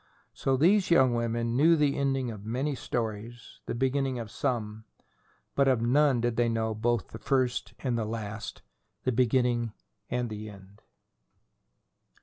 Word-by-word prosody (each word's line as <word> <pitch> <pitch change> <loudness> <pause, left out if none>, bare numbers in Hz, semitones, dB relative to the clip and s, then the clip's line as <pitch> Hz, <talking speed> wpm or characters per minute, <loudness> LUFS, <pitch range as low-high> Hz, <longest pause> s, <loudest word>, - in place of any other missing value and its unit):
So 135 -1 0
these 185 +7 +4
young 130 -7 +5
women 115 0 -1
knew 160 +6 +5
the 145 -3 +2
ending 135 -3 0
of 105 -2 -9
many 130 +7 -1
stories, 115 -2 -5
the - - -2
beginning 135 +1 0
of 115 -3 -6
some; 110 -5 -2 0.7
but 140 -1 +3
of 130 -3 +3
none 135 0 +3
did 120 -1 -1
they 120 -1 +3
know 110 -1 0
both 115 0 0
the 110 - -9
first 130 -2 0
and 125 -3 -1
last, 110 -1 -5 0.4
the 130 - +1
beginning 120 -2 +1 0.4
and 125 -1 -1
the 105 0 -6
end. 100 +1 -15
120 Hz, 145 wpm, -29 LUFS, 110-135 Hz, 0.7 s, young